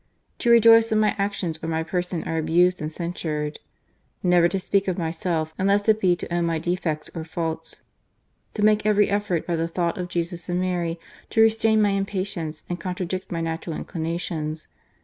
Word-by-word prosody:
GARCIA - - -43
UOPENO - - -45
To 240 - +1 0.2
rejoice 225 0 +6
when 215 0 +3
m}' 210 - +2
a.ctions 190 -5 -2
or - - -2
my 160 0 -1
person 175 0 -2
are 165 - -2
abused 175 +3 +3
and 155 0 -3
censured, 155 -3 -4 0.3
" - - -43
Never 175 -1 +5
to 195 - -1
speak 195 +1 0
of 185 - -1
myself, 160 -1 -2
unless 200 +2 +2
it 220 0 +4
be 180 -2 +4
to 175 - -6
own 175 0 +1
my 165 -1 0
defects 165 -2 -2
or 165 - -5
faults, 160 0 -4 0.4
" - - -45
To 210 - -1
make 215 0 +4
every 210 -1 +3
effort, 200 -5 0
by 170 - -1
the 165 0 -1
thought 170 +1 -1
of 180 - -3
Jesus 175 0 -3
and 175 0 0
Mary, 175 -2 -1 0.3
to 220 - +3
restrain 220 -1 +3
my 205 - +3
impatience 195 -5 -3
and 175 0 -4
contradict 185 +1 -4
my 165 -1 -2
natural 165 0 -3
inclinations. 160 -2 -4
175 Hz, 200 wpm, -24 LUFS, 165-195 Hz, 0.4 s, rejoice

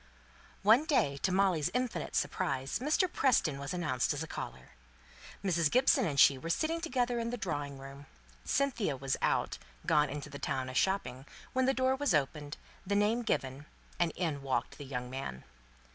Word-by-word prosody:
One 225 +9 +6
day, 145 - +2
to 185 - 0
Molly's 185 -5 +2
infinite 245 -11 -2
surprise, 135 -1 -1
Mr. 305 +8 +2
Preston 230 - +2
was 140 0 -5
announced 150 -7 0
as 145 - -3
a - - -7
caller. - - -7 0.7
Mrs. 170 -5 +2
Gibson 255 - +4
and 140 -3 -1
she 135 0 +7
were 165 - -6
sitting 320 - 0
together 250 -6 0
in 230 0 -2
the 245 - -3
drawing 145 - -3
room; 135 +1 -11 0.4
Cynthia 240 - 0
was 135 0 -1
out - - 0 0.3
gone 150 0 +3
into 145 0 -5
the 140 - -7
town 130 -3 -2
a - - -6
shopping 140 -6 0 0.3
when 260 0 +2
the 270 - +2
door 260 +1 +2
was 265 - +1
opened, 145 +1 -2 0.3
the 200 +2 -1
name 210 +4 +2
given, 135 - -2 0.3
and 170 -1 +2
in 160 -6 -2
walked 135 +2 -2
the 145 - -7
young 125 -2 -4
man. 130 - -5
160 Hz, 175 wpm, -32 LUFS, -, 0.7 s, she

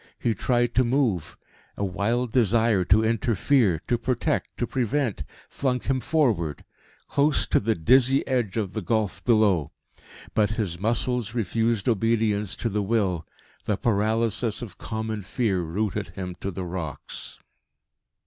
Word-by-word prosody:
He 115 - 0
tried 120 +3 +1
to 130 - +4
move; 120 - 0 0.4
a 100 - -1
wild 110 +6 -1
desire 115 -4 +3
to 105 +5 +4
interfere, 115 - +2
to 120 - +1
protect, 130 +5 -1
to 120 - 0
prevent, 125 - -1 0.2
flung 130 -2 -1
him 130 +1 -1
forward 115 - 0 0.4
close 145 +1 +2
to - - +2
the 110 +1 0
dizzy 130 - +4
edge 120 -6 0
of 100 -4 -2
the 110 - -3
gulf 105 0 -1
below. 100 - +3 0.6
But 105 -1 +2
his 90 -6 -2
muscles 115 +1 -1
refused 115 0 0
obedience 110 -3 +1
to 115 - -2
the 105 0 -1
will. 95 -6 0 0.4
The 105 - 0
paralysis 110 0 0
of 115 - -10
common 110 -1 -4
fear 95 -1 0
rooted 95 +5 -2
him 90 +1 -6
to 100 - -2
the 95 0 -5
rocks. 85 -4 -5
110 Hz, 140 wpm, -25 LUFS, 100-120 Hz, 0.6 s, to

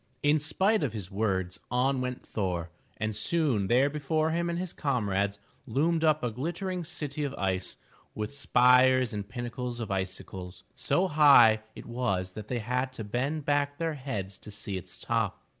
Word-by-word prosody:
In 145 +1 +4
spite 190 +8 +2
of 130 -7 -1
his 100 -4 -6
words, 95 -2 -1
on 130 +1 +1
went 125 0 -4
Thor, 90 -5 -2 0.3
and 110 0 -2
soon 120 - +1
there 125 +6 +4
before 155 +2 0
him 170 +1 0
and 170 - -1
his 180 -1 -3
comrades 100 -7 0 0.3
loomed 160 +7 +1
up 155 -2 +3
a 120 - 0
glittering 175 - -3
city 150 -3 -3
of 140 -1 -3
ice, 95 -1 -2 0.4
with 105 +4 -4
spires 130 -2 +4
and 100 -1 -5
pinnacles 120 0 -4
of 110 -4 -4
icicles. 95 -1 -5
So 190 +2 +1
high 140 -9 +7
it - - -9
was 100 -7 -2
that 105 +1 -8
they 125 - -2
had 125 +3 -1
to 115 - -6
bend 135 +8 -2
back 145 0 +1
their 165 -1 -1
heads 105 -9 -5
to - - -11
see 100 -1 -5
its 90 -1 -7
top. 115 -4 -1
125 Hz, 175 wpm, -29 LUFS, 105-145 Hz, 0.4 s, high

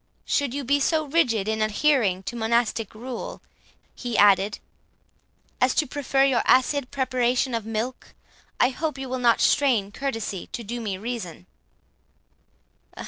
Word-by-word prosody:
Should 280 -3 0
you 285 - -3
be 285 +3 +2
so 310 +2 +1
rigid 250 -9 +1
in 220 0 -1
adhering 215 -4 +2
to 240 - -5
monastic 225 -1 0
rule," 245 +2 -6 0.5
he 240 -3 -4
added, 200 0 +4 1.0
"as 255 +1 +3
to 310 - +2
prefer 275 0 0
your 270 -3 +3
acid 260 +1 +3
preparation 255 -2 0
of 225 -2 -3
milk, 225 +3 -4 0.4
I 250 - +5
hope 305 +3 -3
you 270 0 -5
will 255 0 -3
not 235 -2 +3
strain 235 -9 +2
courtesy 225 -6 -4
to 235 - -4
do 235 +3 -5
me 200 -4 -3
reason." 210 - -6
245 Hz, 140 wpm, -24 LUFS, 220-270 Hz, 1.0 s, I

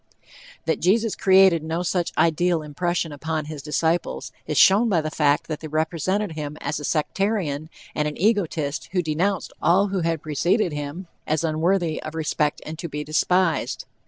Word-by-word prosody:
That - - 0
Jesus 215 +4 +2
created 190 -3 +5
no 160 +3 -2
such 175 -1 -1
ideal 170 0 +2
impression 170 +2 -2
upon 155 +1 -3
his 150 -1 -7
disciples, 160 +3 -1 0.2
is 150 -2 -2
shown 205 - +6
by 180 -5 +3
the 155 0 -3
fact 150 0 +2
that 155 -2 -4
they 155 - -7
represented 170 +6 -1
him 150 -1 -5
as 145 +2 -3
a - - -8
sectarian 160 -1 -1 0.2
and 150 0 0
an 150 - -5
egotist 170 -8 0
who 180 -2 +1
denounced 170 +5 -1
all 185 +5 +3
who 195 -1 -1
had 165 -2 -1
preceded 170 - +1
him 145 +5 -5 0.2
as 155 +1 0
unworthy 165 +1 0
of 155 +1 -7
respect 150 -1 -1
and 155 +1 -7
to 170 - -5
be 150 0 -4
despised. 165 +3 +1
160 Hz, 170 wpm, -23 LUFS, 150-180 Hz, 0.2 s, shown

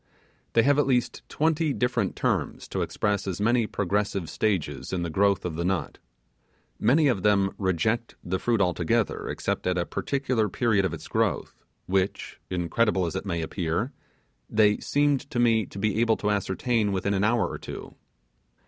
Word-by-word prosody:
They 115 - +5
have 145 +3 +4
at 145 - +2
least 125 -3 +1
twenty 160 -1 +1
different 125 -6 0
terms - - -1
to - - -2
express 100 -1 -1
as 95 -1 -3
many 115 +2 +2
progressive 100 -3 -1
stages 80 - -1
in 90 -2 -1
the 85 - -3
growth 100 +3 +2
of 85 -3 -3
the 85 - -1
nut. 95 0 -2 0.8
Many 145 +8 +4
of 120 -8 +1
them 100 -1 +3
reject 105 +5 0
the 95 +1 -2
fruit 115 -1 +1
altogether 95 +4 0
except - - -2
at 90 0 +1
a 85 - 0
particular 130 -6 -1
period 105 -2 +2
of 90 - -2
its - - -10
growth, - - -1 0.2
which, 95 +1 -1
incredible 95 +2 +1
as 85 - -4
it 95 - -4
may 85 -3 -1
appear, 85 - -2 0.6
they 105 -1 +3
seemed 145 -1 +1
to 130 - -4
me 115 -4 +3
to - - -11
be 105 +1 0
able 115 -2 +3
to 105 - 0
ascertain 105 +2 0
within 95 +1 0
an 100 0 +1
hour 115 +2 +2
or - - -6
two. - - -8
105 Hz, 175 wpm, -26 LUFS, 95-120 Hz, 0.8 s, They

